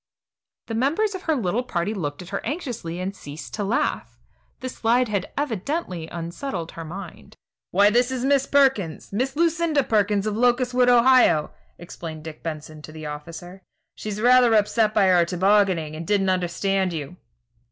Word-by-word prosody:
The 225 Hz, -, -6 dB
members 305 Hz, -, +1 dB
of 375 Hz, -, -6 dB
her 320 Hz, -3 st, 0 dB
little 225 Hz, -2 st, 0 dB
party 205 Hz, -5 st, -2 dB
looked 150 Hz, -5 st, -4 dB
at 175 Hz, -, -12 dB
her -, -, -4 dB
anxiously 235 Hz, -, -4 dB
and 190 Hz, +2 st, -4 dB
ceased 145 Hz, -1 st, -9 dB
to 210 Hz, -, -2 dB
laugh. 200 Hz, +4 st, -1 dB, 0.4 s
The 260 Hz, -, -4 dB
slide 245 Hz, 0 st, +1 dB
had 200 Hz, -3 st, -2 dB
evidently 235 Hz, -, -3 dB
unsettled 170 Hz, +2 st, -5 dB
her 165 Hz, -, -8 dB
mind. 170 Hz, -, -9 dB, 0.3 s
"Why, 200 Hz, +3 st, +4 dB
this 245 Hz, +2 st, +3 dB
is 260 Hz, -1 st, -2 dB
Miss 275 Hz, -1 st, +2 dB
Perkins 265 Hz, -, +1 dB
Miss 260 Hz, +6 st, -1 dB
Lucinda 330 Hz, -2 st, +2 dB
Perkins 210 Hz, -3 st, +1 dB
of 215 Hz, -1 st, -1 dB
Locustwood, 245 Hz, +1 st, +2 dB
Ohio," 245 Hz, -10 st, +5 dB, 0.3 s
explained 160 Hz, -2 st, -8 dB
Dick 160 Hz, -1 st, -9 dB
Benson 155 Hz, -1 st, -7 dB
to 155 Hz, -, -11 dB
the 155 Hz, 0 st, -9 dB
officer, 165 Hz, +5 st, -8 dB, 0.3 s
"She's 210 Hz, -1 st, -6 dB
rather 245 Hz, 0 st, +5 dB
upset 215 Hz, +1 st, +2 dB
by 205 Hz, -, +4 dB
her 180 Hz, -2 st, +5 dB
tobogganing, 180 Hz, -3 st, +2 dB
and 160 Hz, +1 st, -7 dB
didn't 195 Hz, -2 st, +2 dB
understand 185 Hz, +1 st, 0 dB
you." 160 Hz, +2 st, -6 dB
205 Hz, 165 wpm, -23 LUFS, 170-250 Hz, 0.4 s, Ohio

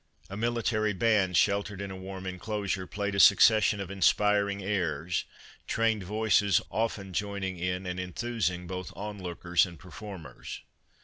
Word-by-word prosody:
A -, -, -4 dB
mili 115 Hz, +2 st, -1 dB
tary 110 Hz, -2 st, +1 dB
band, 95 Hz, -3 st, +2 dB
sheltered 100 Hz, +2 st, +1 dB
in 100 Hz, -1 st, -5 dB
a -, -, -6 dB
warm 95 Hz, 0 st, -7 dB
enclosure, 95 Hz, 0 st, -3 dB
played 100 Hz, -1 st, -3 dB
a 100 Hz, -, 0 dB
succession 105 Hz, +1 st, +6 dB
of 100 Hz, -1 st, -5 dB
inspiring 100 Hz, +1 st, +2 dB
airs, 90 Hz, -4 st, -1 dB, 0.4 s
trained 115 Hz, -2 st, +1 dB
voices 105 Hz, 0 st, +2 dB
often 105 Hz, -4 st, -2 dB
joining 100 Hz, -2 st, -3 dB
in 90 Hz, +1 st, -2 dB
and 90 Hz, 0 st, -3 dB
enthusing 90 Hz, -1 st, -2 dB
both 90 Hz, +1 st, -5 dB
onlookers 90 Hz, -4 st, 0 dB
and 85 Hz, -2 st, -11 dB
per 90 Hz, -, -14 dB
formers. 95 Hz, 0 st, -8 dB
100 Hz, 145 wpm, -29 LUFS, 90-105 Hz, 0.4 s, succession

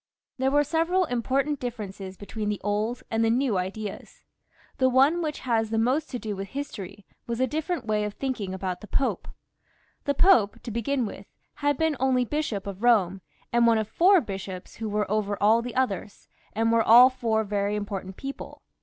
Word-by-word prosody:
There 265 Hz, +1 st, +2 dB
were 290 Hz, +2 st, +3 dB
several 330 Hz, +5 st, +1 dB
important 270 Hz, +2 st, -1 dB
differences 200 Hz, -6 st, -6 dB
between 210 Hz, +1 st, -4 dB
the 210 Hz, -, -2 dB
old 210 Hz, +4 st, -1 dB
and 225 Hz, 0 st, +1 dB
the 225 Hz, -, +3 dB
new 235 Hz, -4 st, +1 dB
ideas. 195 Hz, +3 st, -6 dB, 0.6 s
The 260 Hz, -1 st, +4 dB
one 275 Hz, +7 st, +4 dB
which 305 Hz, -3 st, -3 dB
has 225 Hz, -3 st, 0 dB
most 250 Hz, +7 st, +1 dB
to 250 Hz, -, -4 dB
do 215 Hz, -3 st, -4 dB
with 195 Hz, 0 st, -5 dB
history 205 Hz, -7 st, -7 dB, 0.2 s
was 235 Hz, -1 st, -2 dB
the 260 Hz, -, +2 dB
different 310 Hz, +1 st, -3 dB
way 215 Hz, -1 st, 0 dB
of 210 Hz, 0 st, -4 dB
thinking 250 Hz, -8 st, -3 dB
about 185 Hz, -1 st, -4 dB
the 210 Hz, -, -10 dB
Pope. 265 Hz, +7 st, -1 dB, 0.8 s
The 285 Hz, -, +1 dB
Pope, 250 Hz, -, +4 dB
to 240 Hz, -, -6 dB
begin 235 Hz, +3 st, -1 dB
with, 205 Hz, -, -8 dB, 0.3 s
had 290 Hz, -1 st, 0 dB
been 320 Hz, -2 st, +1 dB
only 255 Hz, -1 st, +2 dB
Bishop 240 Hz, -8 st, -2 dB
of 195 Hz, -2 st, -6 dB
Eome, 200 Hz, -6 st, +3 dB, 0.3 s
and 235 Hz, 0 st, +4 dB
one 230 Hz, -1 st, +5 dB
of 220 Hz, -1 st, -1 dB
four 365 Hz, -, +5 dB
bishops 190 Hz, -3 st, -7 dB
who 220 Hz, -1 st, -4 dB
were 210 Hz, 0 st, 0 dB
over 205 Hz, -1 st, 0 dB
all 220 Hz, +3 st, +4 dB
the 245 Hz, 0 st, -6 dB
others, 210 Hz, -6 st, -2 dB, 0.3 s
and 225 Hz, +1 st, +1 dB
were 230 Hz, 0 st, +4 dB
all 240 Hz, +4 st, +8 dB
four 230 Hz, -4 st, 0 dB
very 205 Hz, 0 st, -1 dB
important 195 Hz, -2 st, -5 dB
people. 275 Hz, 0 st, -8 dB
230 Hz, 190 wpm, -26 LUFS, 205-265 Hz, 0.8 s, all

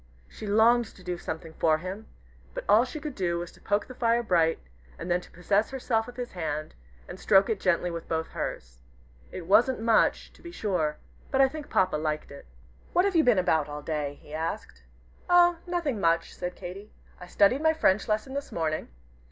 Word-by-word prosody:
She 210 Hz, -, -9 dB
longed 230 Hz, +3 st, +4 dB
to 185 Hz, -, -16 dB
do 180 Hz, -1 st, -4 dB
something 160 Hz, -1 st, -6 dB
for 160 Hz, -1 st, +2 dB
him, 185 Hz, +6 st, -7 dB, 0.5 s
but -, -, -4 dB
all 215 Hz, +4 st, +5 dB
she 305 Hz, +4 st, -7 dB
could 295 Hz, -1 st, -5 dB
do 175 Hz, -6 st, -1 dB
was 170 Hz, 0 st, -5 dB
to -, -, -21 dB
poke 205 Hz, -1 st, 0 dB
the 255 Hz, -, -10 dB
fire 235 Hz, -1 st, +1 dB
bright, 165 Hz, -6 st, +2 dB, 0.4 s
and 180 Hz, -, -5 dB
then 175 Hz, +1 st, +2 dB
to -, -, -16 dB
possess 200 Hz, +4 st, 0 dB
herself 245 Hz, -4 st, -1 dB
of 245 Hz, -, -10 dB
his 245 Hz, -1 st, -5 dB
hand, 155 Hz, -3 st, -4 dB, 0.3 s
and -, -, -9 dB
stroke 195 Hz, +1 st, +4 dB
it 210 Hz, -, -1 dB
gently 175 Hz, 0 st, +1 dB
with 170 Hz, -1 st, -7 dB
both 160 Hz, 0 st, -1 dB
hers. -, -, -6 dB, 0.5 s
It 180 Hz, -, -7 dB
wasn't 225 Hz, +7 st, +4 dB
much, 225 Hz, -1 st, +2 dB
to -, -, -20 dB
be 340 Hz, -, -9 dB
sure, 175 Hz, -, -1 dB, 0.3 s
but 270 Hz, -, 0 dB
I 270 Hz, -, +7 dB
think 300 Hz, +2 st, -8 dB
Papa 185 Hz, -4 st, +2 dB
liked 155 Hz, 0 st, -3 dB
it. 140 Hz, -, -12 dB, 0.5 s
"What 360 Hz, -, +4 dB
have 395 Hz, -2 st, 0 dB
you 325 Hz, -, +5 dB
been 245 Hz, -7 st, +4 dB
about 160 Hz, -5 st, +2 dB
all 145 Hz, 0 st, -6 dB
day?" 150 Hz, -2 st, -3 dB
he 150 Hz, -, -14 dB
asked. 155 Hz, -, -4 dB, 0.5 s
"Oh, 350 Hz, -1 st, +6 dB
nothing, 340 Hz, -10 st, -1 dB
much," 165 Hz, -1 st, +1 dB
said 180 Hz, 0 st, -5 dB
Katy. 195 Hz, +3 st, -9 dB, 0.3 s
"I 180 Hz, -, -10 dB
studied 205 Hz, +9 st, +3 dB
my 315 Hz, 0 st, +4 dB
French 210 Hz, -10 st, +2 dB
lesson 215 Hz, +5 st, -1 dB
this 280 Hz, 0 st, -5 dB
morning. 155 Hz, -2 st, -2 dB
195 Hz, 205 wpm, -27 LUFS, 165-245 Hz, 0.5 s, I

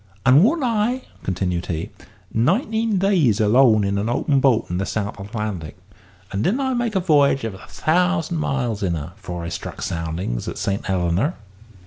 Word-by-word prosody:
And 135 Hz, +5 st, +7 dB
warn't 305 Hz, +7 st, +2 dB
I," 240 Hz, +2 st, 0 dB, 0.2 s
continued 90 Hz, -1 st, -2 dB
he, 80 Hz, -1 st, -3 dB, 0.4 s
"nineteen 215 Hz, -, +1 dB
days 175 Hz, -, +3 dB
alone 110 Hz, 0 st, +5 dB
in 100 Hz, 0 st, 0 dB
an 105 Hz, +3 st, -1 dB
open 135 Hz, +3 st, +1 dB
boat 130 Hz, -4 st, +3 dB
in 90 Hz, +1 st, -2 dB
the 100 Hz, -, -1 dB
South 100 Hz, -1 st, -3 dB
Atlantic; 100 Hz, -7 st, -5 dB, 0.5 s
and 100 Hz, +2 st, -1 dB
didn't 230 Hz, -, +1 dB
I 265 Hz, -1 st, 0 dB
make 240 Hz, -3 st, -1 dB
a -, -, +4 dB
v'y'ge 145 Hz, -6 st, +3 dB
of 115 Hz, -3 st, -3 dB
a 95 Hz, -, -12 dB
thousand 175 Hz, 0 st, +1 dB
miles 125 Hz, -7 st, -1 dB
in 90 Hz, -4 st, 0 dB
her 80 Hz, +3 st, -6 dB
afore 90 Hz, -5 st, -6 dB
I 85 Hz, -, -4 dB
struck 85 Hz, -, -6 dB
soundings 80 Hz, -7 st, -3 dB
at -, -, -4 dB
Saint 100 Hz, 0 st, -2 dB
Helena?" 95 Hz, -, 0 dB
115 Hz, 175 wpm, -22 LUFS, -, 0.5 s, And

